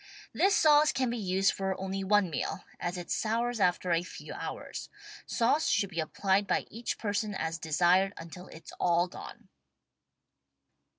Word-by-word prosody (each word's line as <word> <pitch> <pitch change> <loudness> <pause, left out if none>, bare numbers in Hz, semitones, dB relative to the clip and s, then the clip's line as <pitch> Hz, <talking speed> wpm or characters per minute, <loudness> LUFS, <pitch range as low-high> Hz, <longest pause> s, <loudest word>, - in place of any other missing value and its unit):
This 395 +1 +3
sauce 305 -4 +5
can 255 -2 0
be 240 - -2
used 190 -1 +2
for 190 -1 -2
only 195 +1 -3
one 195 -2 +3
meal, - - -3 0.2
as 175 +1 -3
it 175 - -7
sours 230 +2 0
after 180 -1 +1
a 165 0 +3
few 180 - -9
hours. - - -6 0.4
Sauce 245 +7 +2
should 200 -2 +1
be 170 - -4
applied 190 +5 +1
by - - +1
each 230 +2 -4
person 205 -1 -2
as 165 -2 -3
desired 175 +5 +3
until 170 +3 -9
it's 160 - -12
all 175 0 +3
gone. - - -11
195 Hz, 160 wpm, -30 LUFS, 175-220 Hz, 0.4 s, sauce